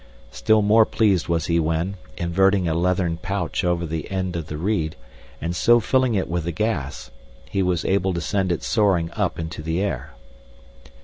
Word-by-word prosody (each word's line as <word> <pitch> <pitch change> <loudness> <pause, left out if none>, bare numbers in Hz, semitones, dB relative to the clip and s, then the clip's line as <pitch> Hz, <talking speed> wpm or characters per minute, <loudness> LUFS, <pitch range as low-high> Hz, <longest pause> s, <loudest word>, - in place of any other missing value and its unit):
Still 110 -1 +2
more 110 +2 +6
pleased 100 -5 +1
was 85 -2 0
he 85 0 +1
when, 80 +4 0 0.2
inverting 95 +2 +2
a 80 - +1
leathern 90 0 0
pouch 95 0 -2
over 85 -1 0
the 80 -1 -4
end 95 -2 -2
of 80 -2 -4
the 75 - -5
reed, 85 -3 -1 0.4
and 85 +2 -3
so 120 +6 +5
filling 130 +1 +1
it 95 - 0
with 85 -1 -2
the 85 - -1
gas, 85 -8 -3 0.4
he 100 - -1
was 90 -2 0
able 95 0 +1
to - - -1
send 95 +2 -1
it 85 - -2
soaring 95 -7 +1
up - - -1
into 80 -1 -5
the 80 +2 -2
air. 80 -14 -3
90 Hz, 185 wpm, -23 LUFS, 85-100 Hz, 0.4 s, more